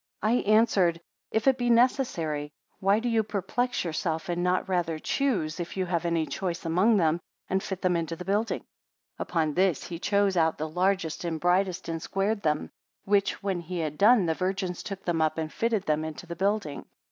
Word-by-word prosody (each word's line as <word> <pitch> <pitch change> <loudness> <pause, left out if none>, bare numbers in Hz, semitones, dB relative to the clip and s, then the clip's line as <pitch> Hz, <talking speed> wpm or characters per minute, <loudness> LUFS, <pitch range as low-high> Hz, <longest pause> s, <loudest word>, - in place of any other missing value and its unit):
77 215 -1 +2
I - - +7
answered; 185 -7 +3 0.3
If 220 +4 0
it 265 -1 +4
be 245 0 +1
necessary, 175 - +2 0.3
why 195 +2 +3
do 230 +2 -2
you 230 -2 +3
perplex 220 +4 -1
yourself, 165 +2 -2
and 175 0 -1
not 180 +1 +1
rather 175 -4 0
choose, 180 - -1
if 175 +2 -5
you 185 - 0
have 175 -1 -1
any 170 -2 +1
choice 175 0 -4
among 185 +7 +3
them, 165 -2 +2 0.3
and 190 0 0
fit 190 -1 -5
them 180 -1 +3
into 165 0 -2
the 180 - -8
building. 210 +4 0 0.6
78 - - -33
Upon 160 -3 0
this 185 -2 +2
he 170 -2 -6
chose 200 0 +2
out 160 -2 +2
the 155 - -3
largest 180 0 0
and 165 -2 -2
brightest, 180 +2 +1
and 165 -1 -3
squared 200 +4 -1
them; 150 -3 -1 0.3
which, 200 -1 +1
when 195 -3 -1
he 175 +1 -6
had 155 -3 -3
done 215 -1 +6
the 165 - +1
virgins 185 0 -2
took 195 -1 -7
them 170 -2 0
up, 155 0 +1
and 160 -1 -3
fitted 225 -4 0
them 155 -2 0
into 160 +3 -6
the 170 0 -6
building. 195 -4 -1
180 Hz, 205 wpm, -27 LUFS, 165-200 Hz, 0.6 s, I